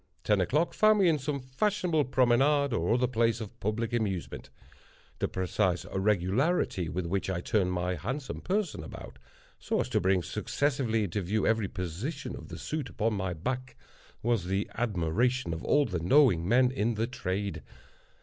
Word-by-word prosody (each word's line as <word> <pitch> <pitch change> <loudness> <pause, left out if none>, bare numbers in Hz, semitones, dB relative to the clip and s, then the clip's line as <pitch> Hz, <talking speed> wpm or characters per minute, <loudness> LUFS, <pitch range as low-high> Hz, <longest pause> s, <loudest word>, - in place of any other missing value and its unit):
Ten 105 -3 +3
o'clock 150 - +1
found 215 0 +5
me 195 -3 +4
in 160 -3 +3
some 140 +1 -2
fashionable 155 +4 0
promenade 135 +2 +3
or 90 +1 +1
other 125 +1 +2
place 115 -2 +1
of 110 -3 -8
public 115 +3 -2
amusement. 100 -7 -2 0.7
The - - +1
precise 95 0 0
regularity 95 - +1
with 90 +1 -3
which 95 +3 -1
I 95 -2 -1
turned 95 -1 +1
my 90 0 -1
handsome 125 - -4
person 195 -1 -1
about, - - -10 0.4
so - - -1
as - - -4
to - - +1
bring 95 -1 +2
successively 130 - 0
into 100 +1 -2
view 105 +4 0
every 110 -3 +2
portion 95 - -5
of - - -10
the - - -8
suit 150 -4 -4
upon 110 +1 -1
my 95 -3 -2
back, 130 +9 -4 0.5
was 115 -6 +1
the 95 +3 -1
admiration 115 +1 0
of 80 - -6
all 145 0 +3
the 90 -7 -2
knowing 95 - +4
men 125 +2 +4
in 115 -2 0
the 110 +2 0
trade. 100 -4 -3
110 Hz, 170 wpm, -29 LUFS, 95-130 Hz, 0.7 s, found